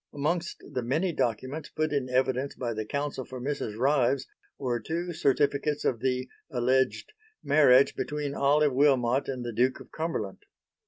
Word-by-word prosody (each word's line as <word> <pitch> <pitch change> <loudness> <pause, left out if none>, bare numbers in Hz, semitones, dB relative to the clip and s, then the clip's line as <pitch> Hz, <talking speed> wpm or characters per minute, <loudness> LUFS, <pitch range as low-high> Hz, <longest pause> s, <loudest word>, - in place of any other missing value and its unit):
Amongst 165 +4 -2
the 125 - -1
many 155 +10 0
documents 130 +5 -2
put 155 -1 -1
in 135 -3 -1
evidence 130 +1 0
by 120 -2 -3
the 110 0 -4
Counsel 140 0 -3
for 130 +1 -8
Mrs. 125 -5 -3
Ryves 135 0 +2 0.3
were 125 -3 -1
two 170 +8 -3
certificates 145 -1 +1
of 120 - +1
the 130 0 -1 0.2
(alleged) 130 - +1 0.3
marriage 140 -3 +5
between 145 -1 -3
Olive 145 +1 +3
Wilmot 130 -2 +3
and 125 -2 -4
the 120 - -4
Duke 125 +4 +1
of - - -14
Cumberland. 155 - -3
135 Hz, 155 wpm, -28 LUFS, 125-145 Hz, 0.3 s, marriage